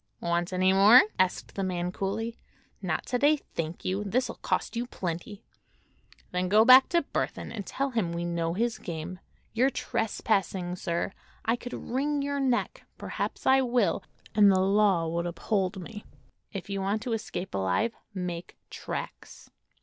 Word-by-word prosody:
"Want 170 +1 -1
any 185 +1 +3
more?" 205 +6 +8 0.2
asked 185 -1 0
the 195 - -2
man 180 -1 -2
coolly. 220 +5 -3 0.5
"Not 175 -5 -2
to 250 - -1
day, 295 +3 +5
thank 165 - -6
you. 190 +3 -1
This'll 240 +6 0
cost - - -2
you 240 +1 -2
plenty." 190 +1 -5 0.9
"Then 180 0 -1
go 215 +3 +6
back 255 +2 +9
to 340 -1 +2
Burthon - - -3
and 205 -4 -6
tell 275 0 -2
him 215 -8 0
we 170 0 -3
know 170 -1 -1
his 235 +3 0
game. 170 +2 -6 0.3
You're 250 +4 +3
trespassing, 195 -7 -1
sir. 170 +1 -2 0.3
I 230 - +3
could 245 0 -8
wring 280 +3 -1
your 285 0 -1
neck—perhaps 260 -3 -2
I 265 0 +5
will—and 220 -4 +2
the 190 - +3
law 195 -3 +3
would 170 +1 -1
uphold 190 +2 -1
me. 210 +3 -8 0.5
If 195 -4 -6
you 200 -1 -3
want 205 +3 -1
to 240 - -2
escape 190 -4 -4
alive, 95 - 0 0.2
make 180 -2 -5
tracks." - - -7
195 Hz, 155 wpm, -28 LUFS, 175-235 Hz, 0.9 s, back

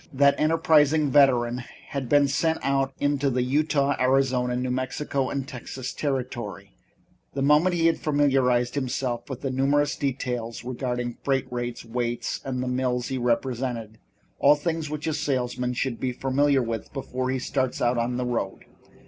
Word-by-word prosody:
That 140 +1 +3
enterprising 155 -2 +3
veteran 125 -3 +4 0.3
had 135 -4 -4
been 145 +1 +5
sent 160 +3 +1
out 135 -1 +1
into 145 -1 +1
the 125 -1 0
Utah, 140 +1 +1
Arizona, 130 -1 +2
New 125 0 -1
Mexico 130 +1 -2
and 135 -1 -3
Texas 130 -1 -6
territory 135 - -4 0.6
the 135 - 0
moment 150 +6 +4
he 165 -1 +1
had 165 - +3
familiarized 130 -5 +2
himself 125 -3 -2
with 130 - -6
the 135 - -2
numerous 140 +3 +2
details 125 -4 -3
regarding 125 -1 -3
freight 135 -2 +1
rates, 120 -1 -4
weights 120 0 -2
and 130 -1 -3
the - - -3
mills 125 -1 -1
he 130 - -2
represented, 120 -2 -1 0.4
all 145 +1 +6
things 160 0 -2
which 150 0 -4
a 160 - 0
salesman 125 -4 -1
should 125 -1 -2
be 130 - -1
familiar 135 +1 +2
with 115 -2 -4
before 130 -2 -3
he 130 - 0
starts 130 0 -1
out 120 0 +2
on 120 +1 -1
the 125 - -1
road. 120 -1 -3
130 Hz, 160 wpm, -25 LUFS, 125-145 Hz, 0.6 s, all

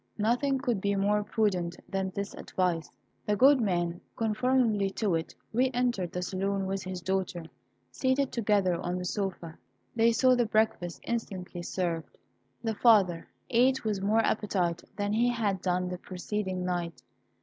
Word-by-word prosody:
Nothing 245 +6 +1
could 245 -7 -1
be 200 0 +1
more 205 +1 +2
prudent 195 -5 0
than 190 -1 -2
this 200 +1 -5
advice. 175 -4 -1 0.4
The 210 - +2
good 265 +4 +6
man, 175 -4 0
conformably 225 -2 +2
to 210 -5 0
it, 165 0 -2 0.2
re 255 +3 +3
entered 240 -8 0
the 180 - -3
saloon 195 +1 -1
with 195 0 -2
his 185 -1 -5
daughter. 185 -2 -1 0.5
Seated 260 +1 +1
together 200 -6 +1
on 180 +1 -2
the 180 - -4
sofa, 180 -4 -4 0.4
they 230 0 +4
saw 255 +3 +4
the 240 -2 +2
breakfast 215 -5 0
instantly 190 -6 -4
served. 170 -2 -3 0.5
The 225 -1 0
father 200 -7 +4 0.2
ate 255 +2 +3
with 210 -3 -1
more 215 +3 +3
appetite 180 -5 0
than 205 0 -1
he 235 +3 +3
had 210 -6 0
done 180 0 0
the 180 -1 -5
preceding 185 0 -3
night. 175 -2 -3
200 Hz, 155 wpm, -29 LUFS, 180-225 Hz, 0.5 s, good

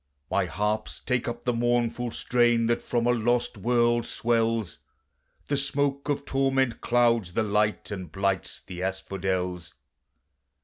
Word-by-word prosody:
"My - - +2
harps 105 +1 -2
take 125 -2 0
up 120 +1 -5
the 125 - +2
mournful 120 0 0
strain 120 0 +2
that 120 +1 +1
from 120 -1 -1
a 120 - +4
lost 120 +1 +1
world 120 +2 +2
swells, 115 -4 0 0.7
The 145 - 0
smoke 140 +1 0
of 140 -1 -1
torment 135 -2 +1
clouds 120 -6 +2
the 110 - +1
light 105 0 0
and 95 -5 -6
blights 95 -1 -1
the 90 -1 -8
asphodels. 95 -2 -3
115 Hz, 135 wpm, -27 LUFS, 100-120 Hz, 0.7 s, a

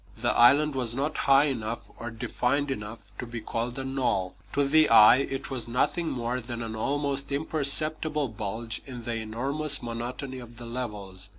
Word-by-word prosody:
The 115 -1 +1
island 140 +5 +5
was 125 -3 -1
not 145 +4 -2
high 135 +1 +7
enough 120 -5 -3
or 120 - -6
defined 130 +5 -1
enough 105 -2 -7
to 125 - -5
be 120 0 -6
called 115 +3 -4
a 135 - -3
knoll. 130 -9 -1 0.2
To 140 0 +1
the 155 +2 +4
eye 115 +1 +8
it 135 0 -3
was 125 -3 -2
nothing 160 +7 0
more 120 0 -2
than 120 0 -6
an 110 -1 -5
almost 140 +3 -1
imperceptible 155 0 +1
bulge 110 +2 -3
in 125 -3 -8
the 115 0 -2
enormous 135 +7 +2
monotony 125 +3 -5
of 120 -1 -12
the 120 - -9
levels. 105 -6 -4
125 Hz, 175 wpm, -27 LUFS, 115-140 Hz, 0.2 s, eye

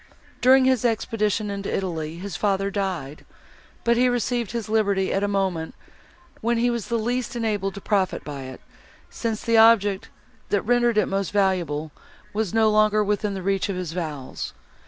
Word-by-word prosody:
During 260 +1 +6
his 260 -3 +2
expedition 215 -3 0
into 200 0 -4
Italy, 165 -4 -3
his 190 0 -6
father 195 +1 0
died; 180 -8 -3 0.6
but 235 0 +3
he 250 +1 +4
received 240 -2 -1
his 230 -2 -4
liberty 200 -3 +1
at 195 - 0
a - - +2
moment, 190 -5 -1 0.7
when 235 +1 +1
he 240 +1 +2
was 235 -3 -3
the 235 - 0
least 245 +3 -2
enabled 210 -4 -1
to 200 - -7
profit 195 -3 0
by 140 -3 -6
it, 130 0 -9 0.5
since 225 -2 -3
the 230 -1 +3
object, 215 -3 +5 0.4
that 205 - +1
rendered 240 0 +2
it 210 - +4
most 195 -1 -2
valuable, 175 -7 0 0.4
was 215 -3 -1
no 220 -1 +3
longer 215 0 +4
within 205 0 -1
the 190 - -5
reach 195 +1 0
of 195 - -2
his 180 -3 -4
vows. 155 -7 -5
205 Hz, 175 wpm, -24 LUFS, 190-225 Hz, 0.7 s, During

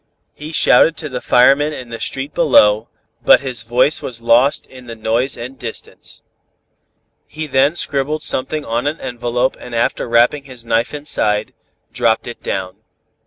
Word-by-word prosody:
"He 150 +2 -9
shouted 160 +1 +4
to 150 - -5
the 125 -1 -5
firemen 140 +5 +4
in 125 -4 -8
the 115 -1 -7
street 135 +2 -4
below, 110 -8 +4 0.3
but - - +6
his 130 -4 -4
voice 125 +6 +2
was 120 -2 -5
lost 120 +4 +3
in 130 -1 -15
the 115 - -7
noise 115 +4 -1
and 125 +3 -8
distance. 115 -2 -9 1.0
He 155 0 -6
then 140 +2 +2
scribbled 145 -1 -1
something 150 +3 -3
on 120 +4 -2
an 155 +3 -3
envelope 120 +1 -2
and 120 -1 -8
after 115 +1 -1
wrapping 120 +5 +2
his 125 -3 -11
knife 115 +4 0
inside, 110 -8 0 0.4
dropped 115 -2 +1
it 120 - -9
down. 95 0 -4
125 Hz, 160 wpm, -17 LUFS, 115-140 Hz, 1.0 s, but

